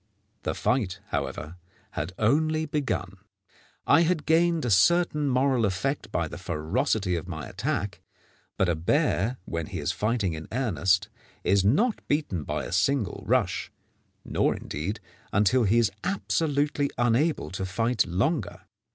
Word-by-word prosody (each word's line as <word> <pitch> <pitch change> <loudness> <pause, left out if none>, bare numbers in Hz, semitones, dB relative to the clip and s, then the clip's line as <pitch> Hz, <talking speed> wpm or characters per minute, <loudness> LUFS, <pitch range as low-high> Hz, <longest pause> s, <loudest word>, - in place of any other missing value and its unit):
The - - -2
fight, 105 -7 0
however, 70 +4 -4 0.3
had 80 +5 -4
only 155 +7 +2
begun. 130 -11 -2 0.7
I - - +6
had 165 -2 +1
gained 165 0 +3
a 120 - 0
certain 150 - +4
moral 130 -1 +2
effect 105 +5 -1
by 80 0 0
the 85 - -8
ferocity 90 +3 0
of 85 +1 -4
my 80 -5 -5
attack, 100 +1 -3 0.6
but 95 - +2
a 85 - +2
bear, 90 +7 +1
when 85 -2 -3
he - - -6
is - - 0
fighting 105 -5 0
in 80 0 -7
earnest, 95 - +1 0.3
is 100 0 +3
not 205 - +2
beaten 145 - -1
by - - -2
a - - -7
single 105 +3 +1
rush, 100 -5 +1 0.5
nor, - - +1
indeed, 85 +9 -4 0.3
until 105 +4 +3
he 105 +4 +3
is 115 -4 +3
absolutely 145 -6 0
unable 120 - +1
to 95 0 -4
fight 115 +5 0
longer. 95 - -1
105 Hz, 145 wpm, -27 LUFS, 90-140 Hz, 0.7 s, I